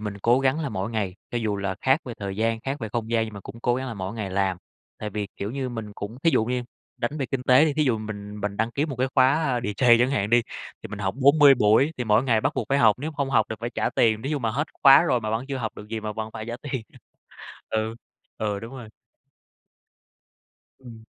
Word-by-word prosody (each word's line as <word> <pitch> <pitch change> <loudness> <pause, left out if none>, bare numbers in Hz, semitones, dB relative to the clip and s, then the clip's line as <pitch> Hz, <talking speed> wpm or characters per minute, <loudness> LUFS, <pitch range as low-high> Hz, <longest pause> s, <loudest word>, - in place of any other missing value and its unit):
mình 105 -1 -5
cố 120 +3 +4
gắng 135 +4 +1
là 150 - -2
mỗi 100 -1 -3
ngày, 105 -5 -2 0.2
cho 120 - -1
dù 105 -3 -1
là 100 -1 -2
khác 135 +4 +3
về 120 -3 -6
thời 100 -1 -5
gian, 115 +1 0
khác 135 +3 -3
về 110 - -4
không 115 0 -3
gian, 115 -1 +2
nhưng 110 -2 -8
mà 100 - -8
cũng 115 +4 -11
cố 120 0 +1
gắng 130 +1 -3
là 120 - -5
mỗi 95 +1 -5
ngày 105 -4 -4
làm. 95 -1 0 0.4
Tại 105 -1 -5
vì, 105 0 -3
kiểu 100 - -4
như, 130 +1 -3
mình 110 -4 -6
cũng 105 +5 -7
thí 165 - +4
dụ 110 - +2
như 125 +1 -1 0.3
đánh 145 +6 -3
về 135 - -1
kinh 125 +1 -3
tế 130 +4 +6
thì 150 -3 0
thí 155 - +2
dụ 120 -5 +1
mình 105 -1 -7
mình 100 0 -3
đăng 115 +1 0
ký 140 +5 -1
một 140 -5 -5
cái 130 +2 0
khóa 135 -1 +3
DJ 120 +2 +4
chẳng 125 +2 +3
hạn 105 -5 0
đi, 120 0 +5 0.4
thì 110 - -7
mình 105 0 -7
học 95 -1 -2
40 140 +1 +7
buổi 120 +7 +3
thì 125 - -2
mỗi 110 +1 +3
ngày 115 -4 +2
bắt - - 0
buộc - - -2
phải 140 - +2
học, 110 -3 +5
nếu 155 +4 -4
không 140 -2 -2
học 110 -5 +3
thì 110 - -3
phải 120 +1 -3
trả - - -1
tiền. 110 -1 +2
Thí 135 - -3
dụ 150 - 0
mà 115 -3 -1
hết 140 +7 -1 0.2
khóa 140 +2 +9
rồi 125 -8 +1
mà 110 0 -3
vẫn 115 +3 -1
chưa 135 - -2
học 115 -4 -4
được 105 - -10
gì 115 0 -4
mà 105 0 -4
vẫn 110 +1 -5
phải 110 - -6
trả 120 - -4
tiền. 135 -4 -4 0.9
Ừ, 110 0 -1 0.4
ừ, 105 -2 -1
đúng 115 +4 -9
rồi. 115 -4 -9 1.9
Ừm. 115 -4 -12
115 Hz, 265 wpm, -25 LUFS, 105-130 Hz, 1.9 s, khóa